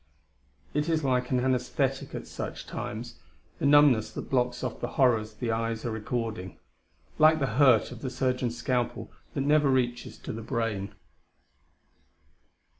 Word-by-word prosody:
It 150 Hz, +3 st, 0 dB
is 160 Hz, -2 st, +1 dB
like 125 Hz, -2 st, +1 dB
an 125 Hz, -, +2 dB
anaesthetic 130 Hz, +1 st, -1 dB
at -, -, -5 dB
such -, -, -6 dB
times, 115 Hz, +2 st, -6 dB, 0.4 s
the -, -, +2 dB
numbness 145 Hz, -6 st, +5 dB
that -, -, -7 dB
blocks 125 Hz, -1 st, +1 dB
off 125 Hz, -, -3 dB
the 120 Hz, -, -1 dB
horrors 115 Hz, -5 st, +3 dB
the 115 Hz, +1 st, -2 dB
eyes 115 Hz, 0 st, -2 dB
are 120 Hz, -, -1 dB
recording 110 Hz, -3 st, -4 dB, 0.6 s
like 155 Hz, +1 st, +7 dB
the 140 Hz, -, 0 dB, 0.2 s
hurt 130 Hz, -6 st, +5 dB
of 125 Hz, -1 st, -9 dB
the 130 Hz, -, -3 dB
surgeon's 125 Hz, -2 st, -1 dB
scalpel 125 Hz, -1 st, -2 dB, 0.2 s
that 140 Hz, -, 0 dB
never 145 Hz, 0 st, +3 dB
reaches 120 Hz, -2 st, 0 dB
to 135 Hz, -, -7 dB
the 115 Hz, -, -6 dB
brain. 110 Hz, -4 st, -2 dB
125 Hz, 150 wpm, -28 LUFS, 115-135 Hz, 0.6 s, like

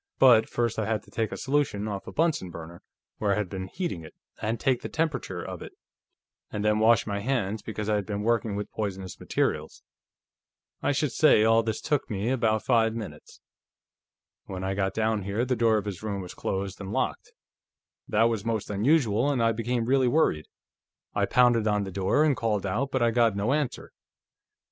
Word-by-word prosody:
But 120 Hz, -4 st, +6 dB
first 120 Hz, -2 st, -1 dB
I 110 Hz, -, -1 dB
had 110 Hz, -1 st, -1 dB
to -, -, -19 dB
take 110 Hz, -1 st, -1 dB
a -, -, -5 dB
solution 135 Hz, -7 st, 0 dB
off 100 Hz, -2 st, -5 dB
a -, -, -6 dB
Bunsen 160 Hz, -, 0 dB
burner, 85 Hz, 0 st, -9 dB, 0.4 s
where 100 Hz, -2 st, +2 dB
I -, -, +1 dB
had 105 Hz, -3 st, -2 dB
been 95 Hz, -1 st, -4 dB
heating 95 Hz, -, -4 dB
it, 80 Hz, -, -12 dB, 0.3 s
and 110 Hz, +2 st, -1 dB
take 130 Hz, -2 st, +1 dB
the -, -, -5 dB
temperature 155 Hz, -, -2 dB
of -, -, -7 dB
it, -, -, -9 dB, 0.8 s
and 105 Hz, 0 st, -3 dB
then 105 Hz, 0 st, +3 dB
wash 115 Hz, +1 st, +4 dB
my 100 Hz, -1 st, -2 dB
hands, 110 Hz, -3 st, -1 dB
because 105 Hz, -1 st, -5 dB
I 105 Hz, -1 st, +2 dB
had 100 Hz, -, -4 dB
been 105 Hz, -1 st, -3 dB
working 115 Hz, -2 st, +1 dB
with 105 Hz, 0 st, -4 dB
poisonous 95 Hz, -4 st, -4 dB
materials. -, -, -2 dB, 1.0 s
I -, -, +1 dB
should -, -, 0 dB
say 105 Hz, -, +5 dB
all 115 Hz, +1 st, +5 dB
this 110 Hz, -1 st, -2 dB
took 150 Hz, -4 st, -1 dB
me 105 Hz, +2 st, -1 dB
about 110 Hz, -4 st, +1 dB
five 115 Hz, -3 st, +3 dB
minutes. 100 Hz, -10 st, -8 dB, 1.0 s
"When 95 Hz, -1 st, -6 dB
I 95 Hz, 0 st, -1 dB
got 95 Hz, 0 st, -1 dB
down 110 Hz, -1 st, +1 dB
here, 100 Hz, +5 st, -1 dB
the 130 Hz, 0 st, 0 dB
door 115 Hz, -1 st, +3 dB
of 105 Hz, -, -3 dB
this 100 Hz, -4 st, -5 dB
room 105 Hz, -2 st, -3 dB
was 90 Hz, -2 st, -7 dB
closed 95 Hz, +1 st, -3 dB
and 95 Hz, 0 st, -6 dB
locked. -, -, -2 dB, 0.8 s
That 110 Hz, +2 st, +3 dB
was 115 Hz, -3 st, +1 dB
most 110 Hz, -2 st, -2 dB
unusual, 120 Hz, +2 st, +2 dB
and 130 Hz, -5 st, +1 dB
I 115 Hz, -, +4 dB
became 115 Hz, +1 st, -1 dB
really 130 Hz, +1 st, +3 dB
worried. 120 Hz, -, +2 dB, 0.7 s
I -, -, +1 dB
pounded 120 Hz, -3 st, +4 dB
on 105 Hz, -1 st, +1 dB
the 95 Hz, -, -6 dB
door, 95 Hz, +10 st, +2 dB
and 150 Hz, -3 st, +3 dB
called 105 Hz, -4 st, -1 dB
out, 120 Hz, +8 st, -1 dB
but 130 Hz, -2 st, 0 dB
I 115 Hz, -, +3 dB
got 115 Hz, -3 st, +3 dB
no 105 Hz, +6 st, +1 dB
answer. 145 Hz, -4 st, -2 dB
110 Hz, 200 wpm, -27 LUFS, 100-120 Hz, 1.0 s, But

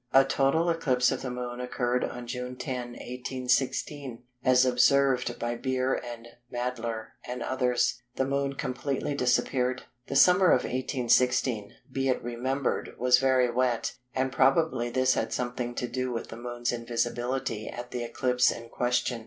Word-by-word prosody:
A 135 Hz, 0 st, +7 dB
total 135 Hz, +5 st, +2 dB
eclipse 130 Hz, -7 st, +2 dB
of 130 Hz, -, -2 dB
the 130 Hz, -, -4 dB
Moon 125 Hz, 0 st, -5 dB
occurred 125 Hz, 0 st, -1 dB
on 125 Hz, 0 st, -5 dB
June 125 Hz, +1 st, -5 dB
10, 125 Hz, -1 st, -4 dB
1816. 125 Hz, +1 st, -2 dB, 0.2 s
As 130 Hz, -1 st, +5 dB
observed 125 Hz, -1 st, +3 dB
by 120 Hz, 0 st, -2 dB
Beer 130 Hz, +1 st, 0 dB
and 120 Hz, -1 st, -5 dB, 0.2 s
Mädler 120 Hz, -2 st, -3 dB
and 125 Hz, 0 st, -5 dB
others, 125 Hz, -1 st, +1 dB
the 135 Hz, -, +1 dB
Moon 140 Hz, 0 st, -1 dB
completely 135 Hz, +2 st, -2 dB
disappeared. 125 Hz, -1 st, +1 dB, 0.2 s
The 135 Hz, -, -4 dB
summer 180 Hz, +6 st, +6 dB
of 130 Hz, -, +4 dB
1816, 125 Hz, -3 st, +1 dB, 0.2 s
be 135 Hz, 0 st, 0 dB
it 130 Hz, -, 0 dB
remembered, 125 Hz, +3 st, -2 dB
was 125 Hz, 0 st, +5 dB
very 130 Hz, -2 st, +3 dB
wet, 125 Hz, -1 st, 0 dB, 0.2 s
and 130 Hz, 0 st, 0 dB
probably 135 Hz, -2 st, +2 dB
this 130 Hz, +1 st, +3 dB
had -, -, -1 dB
something 120 Hz, -1 st, -3 dB
to 125 Hz, -, -2 dB
do 130 Hz, +1 st, -2 dB
with 115 Hz, -, -4 dB
the -, -, -7 dB
Moon's 120 Hz, 0 st, -3 dB
invisibility 120 Hz, 0 st, -2 dB
at 120 Hz, 0 st, -7 dB
the 120 Hz, -1 st, -3 dB
eclipse 125 Hz, +1 st, +2 dB
in 115 Hz, 0 st, -8 dB
question. 125 Hz, 0 st, 0 dB
125 Hz, 155 wpm, -28 LUFS, 120-130 Hz, 0.2 s, A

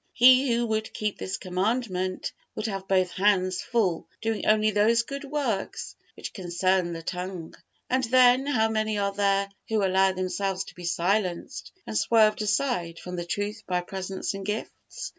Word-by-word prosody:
He 255 Hz, +1 st, +6 dB
who 235 Hz, +1 st, +2 dB
would 220 Hz, -1 st, -2 dB
keep 210 Hz, -1 st, -2 dB
this 190 Hz, -, -3 dB
Commandment, 185 Hz, -1 st, -1 dB, 0.2 s
would 215 Hz, -, -3 dB
have 195 Hz, -3 st, -4 dB
both 185 Hz, -2 st, +2 dB
hands 185 Hz, -2 st, +2 dB
full 195 Hz, -9 st, 0 dB
doing 225 Hz, -1 st, -2 dB
only 215 Hz, 0 st, +4 dB
those 220 Hz, +3 st, +3 dB
good 275 Hz, +4 st, -6 dB
works 270 Hz, -8 st, -3 dB, 0.2 s
which -, -, -7 dB
concern 185 Hz, -1 st, 0 dB
the 165 Hz, 0 st, -7 dB
tongue. 180 Hz, -1 st, -5 dB, 0.3 s
And 260 Hz, +1 st, +1 dB
then, 255 Hz, +2 st, +5 dB
how 225 Hz, -6 st, +2 dB
many 215 Hz, -1 st, -1 dB
are 200 Hz, -1 st, 0 dB
there 200 Hz, 0 st, +2 dB, 0.2 s
who 215 Hz, -3 st, +2 dB
allow 190 Hz, 0 st, +3 dB
themselves 185 Hz, +1 st, -2 dB
to -, -, -13 dB
be 180 Hz, -, -9 dB
silenced 175 Hz, +2 st, -1 dB
and -, -, -6 dB
swerved 215 Hz, -1 st, +4 dB
aside 210 Hz, -6 st, 0 dB
from 180 Hz, +1 st, -7 dB
the 175 Hz, -1 st, -4 dB
truth 205 Hz, +4 st, -3 dB
by 180 Hz, -1 st, 0 dB
presents 190 Hz, +2 st, -4 dB
and 195 Hz, 0 st, -6 dB
gifts! 210 Hz, +3 st, -5 dB
200 Hz, 165 wpm, -26 LUFS, 185-220 Hz, 0.3 s, He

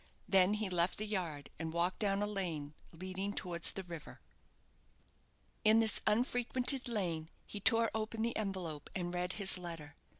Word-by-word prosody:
Then 195 Hz, 0 st, +4 dB
he 210 Hz, -1 st, -2 dB
left 180 Hz, -1 st, +1 dB
the 215 Hz, -, -3 dB
yard, 175 Hz, -9 st, -4 dB
and 160 Hz, 0 st, -4 dB
walked 170 Hz, +2 st, -1 dB
down 200 Hz, -1 st, 0 dB
a -, -, +1 dB
lane 170 Hz, -8 st, -4 dB, 0.2 s
leading 185 Hz, +4 st, -5 dB
towards 170 Hz, -4 st, -1 dB
the 195 Hz, -, -7 dB
river. 170 Hz, -4 st, -10 dB, 1.4 s
In 220 Hz, +1 st, +5 dB
this 220 Hz, -2 st, +3 dB
unfrequented 245 Hz, +3 st, +3 dB
lane 170 Hz, -8 st, -3 dB, 0.2 s
he 205 Hz, -, -8 dB
tore 230 Hz, +2 st, +6 dB
open 220 Hz, 0 st, -3 dB
the 235 Hz, -, -1 dB
envelope, 185 Hz, -8 st, -4 dB
and 175 Hz, -1 st, -3 dB
read 180 Hz, 0 st, -2 dB
his 195 Hz, -3 st, +5 dB
letter. 165 Hz, -4 st, -8 dB
190 Hz, 160 wpm, -34 LUFS, 170-215 Hz, 1.4 s, tore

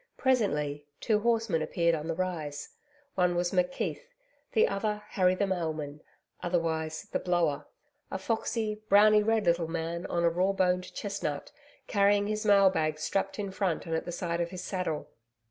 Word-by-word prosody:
Presently, 150 Hz, -, +1 dB
two 215 Hz, -2 st, +2 dB
horsemen 225 Hz, -6 st, +1 dB
appeared 170 Hz, +1 st, +1 dB
on 155 Hz, -1 st, -3 dB
the 165 Hz, -, -1 dB
rise. 160 Hz, -5 st, -3 dB, 0.4 s
One 180 Hz, -1 st, +2 dB
was 175 Hz, 0 st, 0 dB
McKeith; 180 Hz, -, 0 dB, 0.5 s
the 450 Hz, +1 st, +5 dB
other 210 Hz, +1 st, -2 dB
Harry 185 Hz, -1 st, +3 dB
the 200 Hz, -, +1 dB
Mailman 155 Hz, -5 st, -3 dB, 0.4 s
otherwise 160 Hz, -3 st, -1 dB
the -, -, 0 dB
Blower 170 Hz, -5 st, 0 dB, 0.4 s
a -, -, -3 dB
foxy, 215 Hz, +1 st, -2 dB
browny 210 Hz, +1 st, +7 dB
red 220 Hz, 0 st, +1 dB
little 170 Hz, -1 st, +2 dB
man 165 Hz, +1 st, -3 dB
on 170 Hz, -, 0 dB
a 170 Hz, -, +5 dB
raw 185 Hz, +3 st, +1 dB
boned 180 Hz, -1 st, +1 dB
chestnut, 195 Hz, -8 st, -3 dB, 0.3 s
carrying 205 Hz, -2 st, +3 dB
his 215 Hz, +1 st, -2 dB
mail 200 Hz, -2 st, +6 dB
bags 155 Hz, -3 st, -1 dB
strapped 195 Hz, 0 st, -1 dB
in 200 Hz, -2 st, -3 dB
front 185 Hz, -4 st, -1 dB
and 165 Hz, -, -4 dB
at 160 Hz, -, -1 dB
the 175 Hz, -, -4 dB
side 170 Hz, 0 st, -2 dB
of 170 Hz, -, -1 dB
his 180 Hz, 0 st, -7 dB
saddle. 170 Hz, -6 st, -3 dB
180 Hz, 165 wpm, -29 LUFS, 165-200 Hz, 0.5 s, browny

